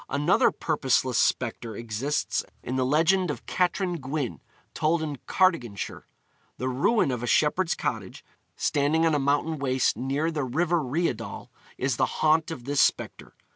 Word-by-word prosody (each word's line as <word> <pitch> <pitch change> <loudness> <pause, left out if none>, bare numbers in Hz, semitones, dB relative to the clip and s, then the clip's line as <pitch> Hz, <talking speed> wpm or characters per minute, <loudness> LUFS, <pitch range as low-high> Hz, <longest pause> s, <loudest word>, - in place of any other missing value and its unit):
Another 150 +5 +3
purposeless 130 -5 0
spectre 115 -2 0
exists 115 +6 -2 0.2
in 125 - -3
the 130 -1 +1
legend 170 +6 +3
of 150 - -5
Catrin 180 0 0
Gwyn, 135 - -3 0.3
told 160 +1 +1
in 150 -3 -4
Cardiganshire. 155 - 0 0.5
The 130 - -2
ruin 140 - +2
of 125 -2 -3
a 120 - -3
shepherd's 165 +6 +2
cottage, - - -4 0.3
standing 150 +3 +1
on 165 - +3
a 145 - +2
mountain 145 +3 0
waste 130 -2 +1
near 140 +5 -1
the 150 -3 -2
river 165 +6 +1
Rheidol, 145 -1 -3 0.3
is 130 -2 -1
the - - +2
haunt 155 +1 +3
of 140 -7 -6
this 140 0 +2
spectre. - - -1
145 Hz, 150 wpm, -26 LUFS, 130-160 Hz, 0.5 s, Another